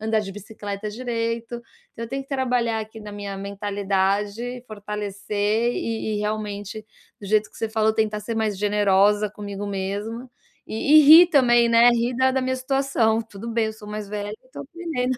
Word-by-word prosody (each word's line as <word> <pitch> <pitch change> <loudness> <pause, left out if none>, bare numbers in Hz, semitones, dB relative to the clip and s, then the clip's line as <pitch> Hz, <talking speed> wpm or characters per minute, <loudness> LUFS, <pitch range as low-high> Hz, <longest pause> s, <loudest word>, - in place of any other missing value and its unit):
andar 220 0 +1
de 195 - -6
bicicleta 205 0 -6
direito. 230 0 -3 0.4
Então 230 - -5
eu 230 - -9
tenho 270 +2 -3
que 270 - -22
trabalhar 250 -4 0
aqui 220 +1 -9
na 210 -1 -9
minha 200 -1 -6
mentalidade, 200 +4 -2
fortalecer 210 +2 -2
e 220 -1 -3
e - - -3
realmente 210 0 -4 0.3
do 200 - -8
jeito 215 +1 +1
que - - -18
você 225 - -2
falou, 220 0 +1
tentar 215 -1 0
ser 225 +2 -4
mais 215 -2 0
generosa 205 +1 +3
comigo 205 -1 -7
mesma. 205 +5 -4 0.3
E 280 +8 +4
e - - +8
rir 320 +5 +10
também, 240 -7 +4
né, 235 +1 +6
rir 240 +1 0
da 260 +1 +3
da 265 0 0
minha 260 0 -1
situação: 255 -4 +1
"Tudo 225 0 -8
bem, 230 -1 +1
eu 220 - -4
sou 215 -1 -12
mais 210 -1 -5
velha 205 0 -4
e 255 - -24
tô - - -7
aprendendo". 310 -5 -3
220 Hz, 185 wpm, -23 LUFS, 205-240 Hz, 0.4 s, rir